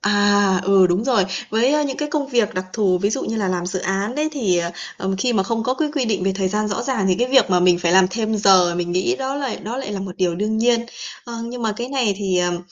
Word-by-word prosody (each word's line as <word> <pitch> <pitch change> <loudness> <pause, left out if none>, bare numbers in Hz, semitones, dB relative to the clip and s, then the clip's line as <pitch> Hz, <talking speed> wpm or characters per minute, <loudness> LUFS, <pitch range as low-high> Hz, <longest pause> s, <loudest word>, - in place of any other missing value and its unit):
à, 205 -2 +3
ừ, 195 -1 +5
đúng 180 +5 0
rồi. 240 -7 +2 0.3
Với 260 +7 +2
những 275 -2 -3
cái 300 - -3
công 295 -1 -2
việc 235 -5 0
đặc 185 0 -2
thù, 195 -5 +1
ví 200 +3 0
dụ 270 - -2
như 225 - -3
là 205 -3 -1
làm 180 -1 -2
dự 185 +1 -3
án 195 +6 -2
đấy 305 +1 0
thì, 195 - +1 0.4
ờ, 190 - -3
khi 245 +4 +1
mà 195 -4 +2
không 225 +3 -2
có 255 +3 0
cái 305 +2 -1
quy 280 -4 0
định 210 -5 -1
về 195 - +1
thời 190 -1 -1
gian 210 +2 -1
rõ 210 +3 -2
ràng 250 -6 -1
thì 185 - +3
cái 245 +1 +1
việc 265 -7 +4
mà 180 -1 +3
mình 180 -1 +4
phải 175 -1 0
làm 190 0 +6
thêm 220 0 -2
giờ 185 -4 +4
mình 175 0 -2
nghĩ 270 - 0
đó 265 0 -3
lại 275 -4 -3
đó 230 +4 -5
lại 265 -6 -5
là 195 - -4
một 190 -2 -7
điều 180 -2 0
đương 210 +4 -1
nhiên. 235 +1 +2 0.4
Ờ, 235 - -8
nhưng 240 +1 -6
mà 220 -1 0
cái 240 +2 -4
này 255 -7 0
thì, 190 -3 -1
ờm, 175 -1 0
210 Hz, 285 wpm, -20 LUFS, 185-245 Hz, 0.4 s, làm